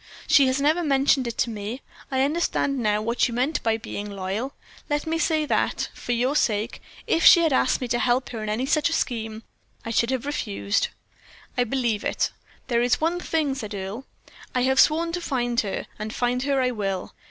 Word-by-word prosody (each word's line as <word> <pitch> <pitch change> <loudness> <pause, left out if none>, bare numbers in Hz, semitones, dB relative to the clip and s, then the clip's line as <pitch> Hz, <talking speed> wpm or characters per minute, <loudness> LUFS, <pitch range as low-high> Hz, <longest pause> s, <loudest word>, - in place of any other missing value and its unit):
She 275 -3 +5
has 260 +1 +1
never 305 +5 +2
mentioned 275 -3 +3
it 235 - -5
to 235 - +1
me. 215 +4 -5 0.3
I 265 -1 +1
understand 285 -2 0
now 210 -2 +1
what 235 +4 +1
you 235 - -5
meant 260 +6 0
by 225 -1 +1
being 210 -2 -6
loyal. 200 +7 -4 0.3
Let 295 0 0
me 325 +1 -1
say 315 -2 +1
that, - - 0
for - - -5
your 250 +4 +1
sake, 215 -4 0 0.2
if 330 - +1
she 340 - +9
had 320 -4 +2
asked 260 - +2
me 250 - -2
to 240 0 +1
help 250 +1 +1
her 225 -3 -5
in 215 - -3
any 225 +5 -1
such 305 +3 +2
scheme, 225 -6 -2 0.4
I 230 - -3
should 230 +1 +2
have 260 -1 -1
refused." 215 -7 -1 0.7
"I 245 - +2
believe 235 -4 -1
it. - - 0 0.3
There 235 -2 +1
is 245 0 +2
one 335 +3 0
thing," 315 -5 0
said 215 -6 -5
Earle, 200 +7 -6 0.5
"I 250 - +2
have 265 +1 +2
sworn 330 +4 +4
to 355 +1 -3
find 245 -6 0
her, 200 -3 -2
and 215 +1 -4
find 245 +2 0
her 275 0 +1
I 255 -1 +2
will. 195 -5 -3
250 Hz, 205 wpm, -24 LUFS, 220-280 Hz, 0.7 s, she